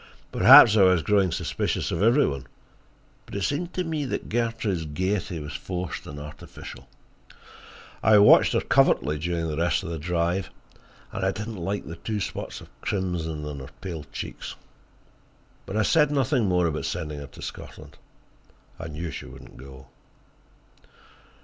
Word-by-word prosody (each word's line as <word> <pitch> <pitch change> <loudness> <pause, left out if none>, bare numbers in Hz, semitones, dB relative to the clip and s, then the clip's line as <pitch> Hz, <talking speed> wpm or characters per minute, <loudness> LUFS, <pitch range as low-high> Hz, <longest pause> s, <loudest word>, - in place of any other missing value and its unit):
Perhaps 110 - +9
I - - +6
was 90 -3 +5
growing 100 0 +2
suspicious - - -2
of 85 - -2
every 120 +7 +5
one, 70 -2 -4 0.8
but - - -9
it 100 - -2
seemed 170 - -1
to 185 - 0
me 160 -3 -2
that 130 - -4
Gertrude's 115 -7 -1
gaiety 95 +4 -2
was 75 0 -7
forced 90 +5 -5
and 75 0 -8
artificial. 75 0 -10 1.1
I 110 +1 +6
watched 105 0 +7
her - - +2
covertly 75 +4 +2
during 85 0 -2
the 75 -1 -3
rest 85 +3 +1
of 85 - -5
the 80 - -4
drive, 85 +3 -1 0.6
and 100 - -4
I 95 - +3
did 105 +3 -4
not 110 -4 -7
like 100 +4 -3
the 85 - -8
two 105 +5 -3
spots 95 - -5
of - - -18
crimson 85 -5 -2
in 75 -1 -6
her 65 - -9
pale 85 -6 -6
cheeks. - - -6 1.1
But 100 - -3
I 110 - +3
said 150 +6 +4
nothing 135 -5 +1
more 90 -1 +2
about 75 -2 -2
sending 75 -4 -4
her 70 - -8
to - - -14
Scotland: - - -9 0.8
I 80 - -6
knew 80 +2 -5
she - - -7
would - - -12
not - - -15
go. 65 0 -12
90 Hz, 170 wpm, -25 LUFS, 80-105 Hz, 1.1 s, Perhaps